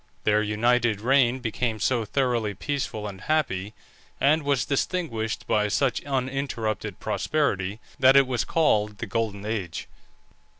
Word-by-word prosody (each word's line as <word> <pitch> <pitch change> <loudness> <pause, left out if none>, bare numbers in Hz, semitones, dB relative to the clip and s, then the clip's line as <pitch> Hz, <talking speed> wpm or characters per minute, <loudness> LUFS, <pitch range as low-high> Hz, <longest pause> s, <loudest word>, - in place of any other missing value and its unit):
Their 105 0 +3
united 110 +1 +2
reign 130 +1 +3
became 115 -1 -2
so 115 +2 +1
thoroughly 120 -4 0
peaceful 120 -4 -3
and 95 -2 -8
happy, 110 -10 -1 0.4
and 155 +4 +4
was 140 -4 +1
distinguished 135 -7 -2
by 105 0 +2
such 125 +4 0
uninterrupted 130 -5 -2
prosperity, 105 -9 -1 0.2
that 130 0 +6
it 140 0 +7
was 125 -3 -1
called 105 -10 +1
the - - -4
Golden 105 -1 -2
Age. 100 -6 -3
115 Hz, 130 wpm, -25 LUFS, 105-135 Hz, 0.4 s, it